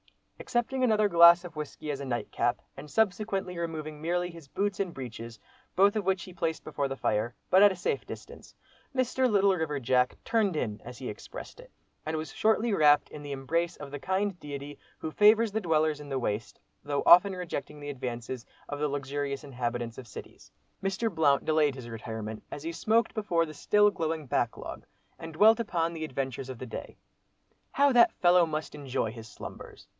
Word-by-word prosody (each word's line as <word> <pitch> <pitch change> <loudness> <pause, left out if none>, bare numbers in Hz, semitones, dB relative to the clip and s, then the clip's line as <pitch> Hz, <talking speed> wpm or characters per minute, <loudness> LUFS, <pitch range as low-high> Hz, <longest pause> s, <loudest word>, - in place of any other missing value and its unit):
Accepting 260 - -1
another 215 -3 +4
glass 170 -1 +7
of 175 - -9
whisky 150 0 -5
as 140 -1 -4
nightcap, 130 -3 -1 0.2
and 145 +2 -10
subsequently 195 -2 0
removing 155 -2 -5
merely 175 +2 -1
his 165 -4 -13
boots 200 +6 -2
and 190 -3 -1
breeches, 115 -4 -8 0.4
both 200 +3 +5
of 215 - 0
which 190 -1 0
he 185 - -10
placed 165 -2 -2
before 140 - -2
the 135 - -4
fire, 115 0 -1 0.2
but 185 - +7
at 205 0 +8
a - - -4
safe 175 - -2
distance, - - -10 0.4
Mr. 255 0 +2
"Little 200 -2 +4
River 155 -4 -2
Jack" 125 0 +2
"turned 215 -6 +1
in" 105 -8 -2
as 125 0 -9
he 130 - -6
expressed 105 - -9
it, - - -14 0.4
and 160 0 -1
was 155 +1 -5
shortly 220 +1 +2
wrapped 150 -5 +5
in 150 - -9
the 145 -1 -7
embrace 165 +6 -1
of 145 -2 -9
the 145 - -5
kind 190 +4 -1
deity 145 -1 -7 0.2
who 160 - -5
favours 215 +4 +5
the 220 +2 -1
dwellers 155 -4 +1
in 145 - -10
the 135 - -1
Waste, 105 -3 -3 0.2
though 145 -1 -1
often 190 +3 +8
rejecting 170 -5 -5
the 145 0 -5
advances 125 -2 -5 0.2
of 145 - -5
the 150 - +1
luxurious 140 0 -3
inhabitants 120 -3 -4
of 125 - -10
cities. 105 - -11 0.3
Mr. 195 +3 -1
Blount 145 -4 +3
delayed 155 -3 +2
his 130 -3 -8
retirement, 110 -1 -6
as 145 - -7
he 165 - -3
smoked 225 +7 +1
before 175 -6 +1
the 155 - -9
still 210 +7 +3
glowing 160 -4 -2
"back 125 - 0
log" - - -8 0.4
and 165 -1 -8
dwelt 215 +7 +6
upon 170 -7 -1
the 160 -1 -5
adventures 135 -3 -4
of 130 - -6
the 130 - -7
day. 115 - -8 0.8
"How 280 0 +4
that 240 -1 +6
fellow 175 -1 +4
must 155 0 -4
enjoy 135 -6 -2
his 110 -1 -10
slumbers!" - - -10
155 Hz, 190 wpm, -29 LUFS, 135-190 Hz, 0.8 s, at